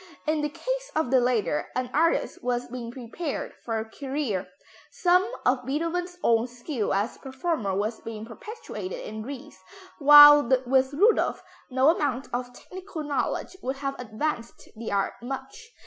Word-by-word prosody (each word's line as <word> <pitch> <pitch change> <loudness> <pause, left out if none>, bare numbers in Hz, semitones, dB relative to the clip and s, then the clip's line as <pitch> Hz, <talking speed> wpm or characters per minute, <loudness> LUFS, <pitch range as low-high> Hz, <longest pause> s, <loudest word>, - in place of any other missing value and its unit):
In 310 0 +1
the 295 - -1
case - - -4
of 315 -6 0
the 260 - +6
latter 235 -11 0
an 255 0 -2
artist 330 +2 +1
was 245 0 -1
being 240 -1 -6
prepared 260 +6 -5
for 225 -1 -2
a 220 - -3
career; 260 -6 -3 0.4
some 365 +4 +2
of 250 0 +2
Beethoven's 335 +6 -2
own 230 +1 +3
skill 245 -1 -3
as 200 +4 -1
performer 265 - -2
was 215 +3 -2
being 220 -1 -7
perpetuated 425 - -7
in 215 0 -6
Ries, 255 -3 -8 0.4
while 295 -2 +9 0.2
with 265 +1 +3
Rudolph 415 +10 +3 0.3
no 260 +2 +4
amount 280 -5 0
of 245 0 -3
technical 365 +4 -8
knowledge 290 +5 -2
would 265 +1 -2
have 275 0 -3
advanced 235 +1 -4
the 225 +1 -6
art 200 -1 0
much. 270 - -7
265 Hz, 150 wpm, -26 LUFS, 235-310 Hz, 0.4 s, while